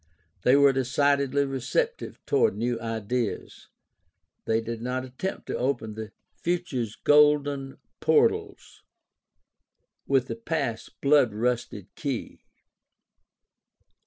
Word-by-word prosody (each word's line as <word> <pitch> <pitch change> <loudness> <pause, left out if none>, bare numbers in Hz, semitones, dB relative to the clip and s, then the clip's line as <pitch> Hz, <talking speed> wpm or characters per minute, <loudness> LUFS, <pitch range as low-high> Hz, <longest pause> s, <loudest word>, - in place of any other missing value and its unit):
They 125 - +5
were 140 -1 +6
decidedly 140 +1 +2
receptive 135 -2 -2
toward - - +2
new 120 +2 -1
ideas. 115 0 -3 0.8
They 110 0 +2
did 115 0 -5
not 130 +2 -2
attempt 130 +10 -5
to - - -4
open 120 -4 -1
"the 110 -1 -7 0.3
future's 160 - -2
golden 145 -2 +3 0.2
portals - - +1 1.3
with 135 -2 +3
the 115 - -5
past's 115 -2 -3
blood 140 -5 +3
rusted 115 -4 -2
key." 135 -6 -5
130 Hz, 100 wpm, -26 LUFS, 115-140 Hz, 1.3 s, were